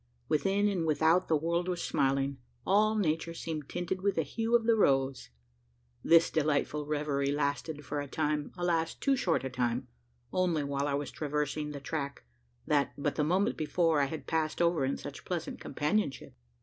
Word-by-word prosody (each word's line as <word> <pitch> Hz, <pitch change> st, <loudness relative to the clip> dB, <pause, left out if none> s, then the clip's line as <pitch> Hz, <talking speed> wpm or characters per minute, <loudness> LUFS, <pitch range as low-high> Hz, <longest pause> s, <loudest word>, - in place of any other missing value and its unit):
Within 195 Hz, +7 st, +2 dB
and 180 Hz, -5 st, 0 dB
without 160 Hz, +4 st, +3 dB
the 160 Hz, -, +3 dB
world 170 Hz, +3 st, -1 dB
was 180 Hz, -2 st, -1 dB
smiling 135 Hz, -2 st, 0 dB, 0.3 s
all 215 Hz, +3 st, +3 dB
nature 165 Hz, -4 st, 0 dB
seemed 155 Hz, -4 st, -5 dB
tinted 175 Hz, +1 st, -3 dB
with 200 Hz, 0 st, +1 dB
the 160 Hz, -, +1 dB
hue 225 Hz, -, 0 dB
of 235 Hz, -, +4 dB
the 230 Hz, 0 st, +4 dB
rose! 135 Hz, -9 st, +2 dB, 0.7 s
This 165 Hz, 0 st, +5 dB
delightful 150 Hz, -1 st, 0 dB
reverie 145 Hz, -2 st, 0 dB
lasted 145 Hz, +1 st, -2 dB
for 145 Hz, 0 st, -2 dB
a 145 Hz, -, -6 dB
time 150 Hz, +1 st, -1 dB
alas! 165 Hz, -2 st, 0 dB
too 275 Hz, -, +1 dB
short 165 Hz, -, +1 dB
a 130 Hz, -, -2 dB
time 125 Hz, 0 st, -1 dB, 0.4 s
only 175 Hz, -5 st, +1 dB
while 140 Hz, 0 st, -1 dB
I 140 Hz, -, 0 dB
was 145 Hz, 0 st, -3 dB
traversing 150 Hz, 0 st, -2 dB
the 145 Hz, -1 st, -6 dB
track, 140 Hz, 0 st, -4 dB, 0.4 s
that, 145 Hz, -1 st, +1 dB
but 145 Hz, 0 st, -1 dB
the 150 Hz, -, 0 dB
moment 190 Hz, +9 st, +1 dB
before, 160 Hz, 0 st, +2 dB
I -, -, +3 dB
had 150 Hz, +2 st, -6 dB
passed 160 Hz, -1 st, -1 dB
over 170 Hz, -5 st, +2 dB
in 135 Hz, -, -1 dB
such 145 Hz, 0 st, -8 dB
pleasant 175 Hz, -3 st, -4 dB
companionship. 150 Hz, -3 st, -1 dB
155 Hz, 175 wpm, -31 LUFS, 140-175 Hz, 0.7 s, This